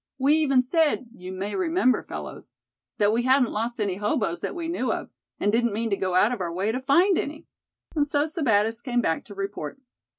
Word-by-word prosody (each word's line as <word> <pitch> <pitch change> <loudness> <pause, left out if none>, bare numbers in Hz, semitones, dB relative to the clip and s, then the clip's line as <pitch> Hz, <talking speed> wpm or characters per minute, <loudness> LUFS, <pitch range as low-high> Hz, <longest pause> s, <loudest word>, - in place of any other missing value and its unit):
We 275 +2 +3
even 275 -5 +3
said, 295 -3 +1
you 185 -4 -9
may 195 +2 -4
remember, 330 -8 +2
fellows, - - -8 0.4
that 210 -1 +3
we 235 - +2
hadn't 255 -1 +3
lost 235 +3 -2
any 200 -3 -1
hoboes 205 - -1
that - - -4
we 335 -2 -4
knew 330 -7 -1
of, - - -4 0.3
and 205 - +2
didn't 235 0 +1
mean 225 +1 -2
to - - +3
go 185 -2 -2
out 205 +5 +4
of 240 -6 -3
our 170 -2 -2
way 190 +5 -1
to 255 +3 -3
find 345 +8 +4
any. 305 +3 -5 0.5
And 290 -2 +2
so 290 -1 +1
Sebattis 225 - +1
came 245 -2 0
back 160 -7 0
to 205 - -11
report." 195 - -5
240 Hz, 210 wpm, -25 LUFS, 205-285 Hz, 0.5 s, out